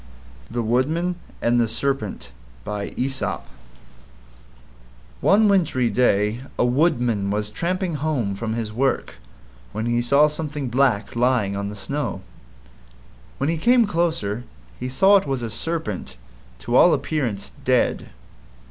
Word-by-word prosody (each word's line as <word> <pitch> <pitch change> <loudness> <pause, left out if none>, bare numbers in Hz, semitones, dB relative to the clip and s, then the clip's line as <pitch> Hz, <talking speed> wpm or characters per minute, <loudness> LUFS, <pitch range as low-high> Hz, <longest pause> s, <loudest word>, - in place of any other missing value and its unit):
THE 120 0 -2
WOODMAN 155 +10 +1 0.3
AND 120 +1 +3
THE 115 - +2
SERPENT 115 - -2 0.3
One 105 0 -2 2.0
wintry 160 - +2
day 105 0 +2 0.2
a - - +3
Woodman 120 -7 +1
was 105 +1 -2
tramping 180 - -2
home 145 -9 -1
from 110 +3 -3
his 110 -2 -3
work 130 - -1 0.6
when 110 +1 -3
he 120 0 +1
saw 140 +5 +5
something 150 -3 -3
black 120 -5 +1
lying 120 -5 +2
on 100 0 -3
the 105 - -7
snow. 140 0 -3 1.2
When 140 - -1
he 165 - -1
came 240 +5 +5
closer, 160 - -1 0.4
he 125 - -3
saw 195 +10 +5
it 190 - -2
was 135 -3 -2
a 115 - -4
Serpent 115 - -4 0.4
to - - -2
all - - +7
appearance 120 -10 -3
dead. 125 -1 +1
125 Hz, 125 wpm, -23 LUFS, 105-150 Hz, 2.0 s, all